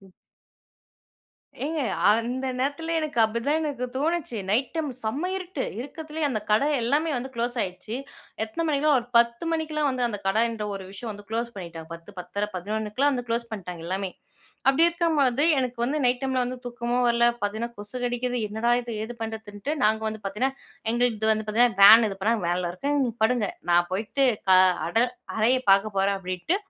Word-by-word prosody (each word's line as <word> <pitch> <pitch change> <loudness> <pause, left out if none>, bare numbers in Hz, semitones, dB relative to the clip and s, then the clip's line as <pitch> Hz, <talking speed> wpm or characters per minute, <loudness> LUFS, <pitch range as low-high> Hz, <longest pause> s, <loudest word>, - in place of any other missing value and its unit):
அ - - -19
ம். - - -18 1.5
ஏங்க 310 0 -1 0.3
அந்த 240 +4 0
நேரத்துல 290 +5 -1
எனக்கு 300 -6 -3
அப்டிதான் 235 +7 +1
எனக்கு 285 -5 -2
தோணுச்சு. 305 -4 -1
நைட் 240 +5 +1
டைம் 315 -3 -1
செம்ம 275 +11 -2
இருட்டு. 370 -7 -4 0.2
இருட்டுல்லேயே 310 +3 -5
அந்த 225 -6 -1
கடை 215 +7 +4 0.2
எல்லாமே 290 +7 +1
வந்து 260 +2 -4
குளோஸ் 240 +1 -2
ஆயிட்ச்சு. 185 +4 -6 0.5
எத்தனை 275 +10 -4
மணிக்குன்னா, 295 0 +3
ஒரு 240 - -5
10 235 +4 +2
மணிக்கெல்லாம் 310 -2 0
வந்து 250 -2 0
அந்த 205 -3 -4
கடை 215 +4 +3
என்ற 220 -2 -4
ஒரு 195 - -6
விஷயம் 220 +4 -6
வந்து 205 0 -12
குளோஸ் 235 +1 -2
பண்ணிட்டாங்க. 170 -4 -8
10 170 0 -12
பத்தரை, 200 +4 -3
11 215 +8 0
வந்து 245 -1 -3
குளோஸ் 235 0 -1
பண்ட்டாங்க, 180 -5 -6
எல்லாமே. 190 +1 -2 0.6
அப்டி 275 +5 +5
இருக்கும்பொழுது 300 -6 +1 0.2
எனக்கு 250 -2 -2
வந்து 285 +5 0
நைட் 245 0 +2
டைம்ல 260 -1 +1
வந்து 250 +1 -5
தூக்கமும் 240 0 0
வரல, 235 0 +4 0.2
பாத்தீங்கன்னா 220 +3 -2
கொசு 205 +4 -6
கடிக்குது. 245 0 -1
என்னடா 220 +3 0
இது? 235 -1 -6
ஏது 240 - -6
பண்றதுன்ட்டு, 220 +3 -5
நாங்க 220 +1 +3
வந்து 220 0 -6
பாத்தீங்கன்னா 240 +8 -1 0.4
எங்களது 240 -1 +1
இது 220 0 +3
வந்து 215 0 -2
பாத்தீங்கன்னா 225 -1 +3
வேன் 220 +3 +10
இது 195 - -6
பண்ணாங்க. 220 0 +1
வேன்ல 175 0 0
இருக்கேன். 280 +11 -1
"நீ - - -1
படுங்க, 225 -3 +2 0.2
நான் 175 0 +4
போயிட்டு 220 +8 0 0.2
கா 185 - +8 0.3
அடர் 240 +7 +2 0.2
அறைய 245 +4 +3
பாக்க 200 +1 +2
போறேன்" 195 +1 +2
அப்டின்ட்டு 185 - -1
235 Hz, 180 wpm, -26 LUFS, 210-270 Hz, 1.5 s, வேன்